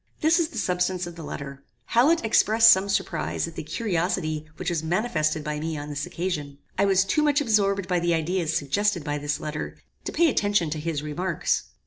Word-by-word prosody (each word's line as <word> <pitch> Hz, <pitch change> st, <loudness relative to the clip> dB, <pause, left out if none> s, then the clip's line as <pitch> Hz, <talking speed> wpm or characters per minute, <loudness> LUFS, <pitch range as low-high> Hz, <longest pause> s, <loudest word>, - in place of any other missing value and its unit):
"This 320 Hz, +3 st, +4 dB
is 335 Hz, -, +2 dB
the 340 Hz, -, -10 dB
substance 180 Hz, 0 st, 0 dB
of 175 Hz, -1 st, -8 dB
the 170 Hz, -, -9 dB
letter. 140 Hz, -2 st, -7 dB, 0.3 s
Hallet 265 Hz, +4 st, +3 dB
expressed 225 Hz, +1 st, +6 dB
some 195 Hz, -1 st, +3 dB
surprize 195 Hz, -, -1 dB
at 165 Hz, -, -9 dB
the -, -, -5 dB
curiosity 165 Hz, -3 st, -2 dB
which 175 Hz, -, -2 dB
was 165 Hz, -3 st, -1 dB
manifested 160 Hz, -3 st, 0 dB
by 150 Hz, 0 st, -3 dB
me 160 Hz, 0 st, -3 dB
on 145 Hz, 0 st, -6 dB
this 145 Hz, +4 st, -3 dB
occasion. 165 Hz, -6 st, -4 dB, 0.2 s
I -, -, +2 dB
was 195 Hz, -1 st, +3 dB
too 250 Hz, +10 st, +1 dB
much 295 Hz, -1 st, +3 dB
absorbed 200 Hz, -7 st, +1 dB
by 180 Hz, -2 st, +1 dB
the 170 Hz, 0 st, +1 dB
ideas 165 Hz, 0 st, -1 dB
suggested 175 Hz, +5 st, 0 dB
by 145 Hz, 0 st, -2 dB
this 145 Hz, 0 st, -2 dB
letter, 150 Hz, 0 st, -5 dB, 0.3 s
to -, -, -3 dB
pay 340 Hz, -, +3 dB
attention 205 Hz, -, +1 dB
to 155 Hz, -, -3 dB
his 150 Hz, -2 st, -3 dB
remarks. 170 Hz, +3 st, -1 dB
175 Hz, 200 wpm, -25 LUFS, 155-205 Hz, 0.3 s, expressed